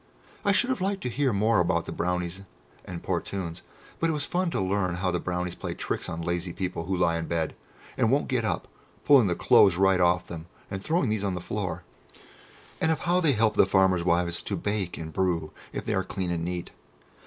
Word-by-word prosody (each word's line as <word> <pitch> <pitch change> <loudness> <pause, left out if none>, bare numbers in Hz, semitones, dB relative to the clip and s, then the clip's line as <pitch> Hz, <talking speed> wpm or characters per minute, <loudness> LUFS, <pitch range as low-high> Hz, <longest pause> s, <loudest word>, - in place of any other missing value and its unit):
I 200 - +3
should 245 +6 +3
have 255 - -2
liked 195 0 -1
to 125 - -1
hear 130 +2 +1
more 110 +2 +3
about 90 - +1
the - - -6
Brownies 90 +1 -2 0.4
and 85 -2 -7
Portunes, 90 -1 -3 0.4
but 165 - +2
it - - +1
was 145 -1 -2
fun 180 0 0
to - - -1
learn 95 -2 0
how 90 +1 0
the 90 - 0
Brownies 90 0 -2
play - - -5
tricks - - -3
on 85 +1 -4
lazy 85 +1 -2
people 90 -3 -3
who 95 +1 -1
lie 85 -2 +2
in 80 - -4
bed 80 -2 -1 0.5
and 115 - +4
won't 140 +4 +2
get 125 -3 0
up, 110 - -1 0.4
pulling 135 -7 +7
the 90 - +1
clothes 95 +1 +5
right 95 0 +4
off 90 0 +3
them, 85 -1 -8 0.2
and 95 -1 -3
throwing 155 - +1
these 105 -2 -1
on 95 -2 -1
the - - -3
floor, 95 +1 -4 1.0
and 160 - +3
of 160 - -1
how 175 +1 +2
they 155 -5 +4
help 110 -1 +3
the 100 - +4
farmers' 95 -2 +3
wives 85 0 +1
to - - -3
bake 100 -4 -2
and 80 -1 -7
brew 85 -4 0 0.2
if - - -5
they - - 0
are 95 - +1
clean 95 -2 -3
and 85 -1 -1
neat. 90 0 -4
95 Hz, 220 wpm, -27 LUFS, 85-115 Hz, 1.0 s, pulling